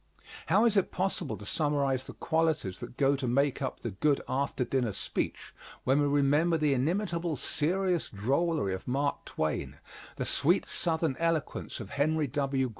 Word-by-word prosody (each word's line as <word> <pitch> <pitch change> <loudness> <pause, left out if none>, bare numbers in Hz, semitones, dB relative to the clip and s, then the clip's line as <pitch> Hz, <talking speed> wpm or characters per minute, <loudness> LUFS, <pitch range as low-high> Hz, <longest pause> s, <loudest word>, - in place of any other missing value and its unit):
How 200 +8 +4
is 225 -3 +4
it 195 - +3
possible 180 - -2
to 105 - -10
summarize 140 -1 0
the - - -9
qualities 160 - 0
that - - -8
go 140 0 +3
to 135 -2 -3
make 140 +3 +1
up 130 - -3
the 115 - -3
good 140 +9 +2
after 135 -1 0
dinner 125 -5 0
speech, - - -3 0.3
when 135 +3 +3
we 145 - +3
remember 145 +4 +3
the 150 -2 +2
inimitable 170 +3 0
serious 175 +6 0
drollery 135 - 0
of 95 - -6
Mark 140 +3 -1
Twain, 80 -1 -2 0.4
the - - -3
sweet 170 +7 +2
southern 160 -4 0
eloquence 165 -5 -1
of 105 -4 -8
Henry 155 +2 +1
W. 135 -1 0
145 Hz, 165 wpm, -30 LUFS, 130-165 Hz, 0.4 s, How